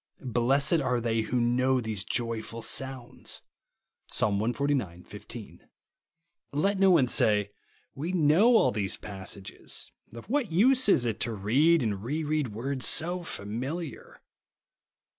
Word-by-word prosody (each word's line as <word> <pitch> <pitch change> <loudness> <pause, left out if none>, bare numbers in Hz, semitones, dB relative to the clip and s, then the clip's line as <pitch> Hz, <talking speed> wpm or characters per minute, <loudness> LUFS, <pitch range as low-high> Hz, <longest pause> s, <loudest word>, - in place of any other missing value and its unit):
Blessed 140 +7 +3
are 125 -3 0
they 115 -1 0
Avho 110 - -6
know 125 +2 +2
these 110 -5 -3
joyful 115 0 -3
sounds, 130 -2 -3 0.6
(Psa. - - +1
Ixxxix. 110 -3 -1
15). 105 +1 -11 0.8
Let 195 +8 0
no 195 0 +5
one 160 -8 +5
say, 105 -3 +2
— - - -35
" - - -39
We 155 +6 -4
know 185 +8 +5
all - - +3
these 100 -2 -1
passages; 100 -1 -6 0.2
of 115 - -10
what 250 - -1
use 250 +7 +4
is 125 -10 +4
it 115 -2 -2
to 115 -1 -1
read 135 +11 +3
and 100 -3 -2
re 150 +7 -2
read 150 -2 0
words 125 +5 -2
so 175 +3 +1
familiar 135 +5 -6
125 Hz, 140 wpm, -28 LUFS, 110-155 Hz, 0.8 s, no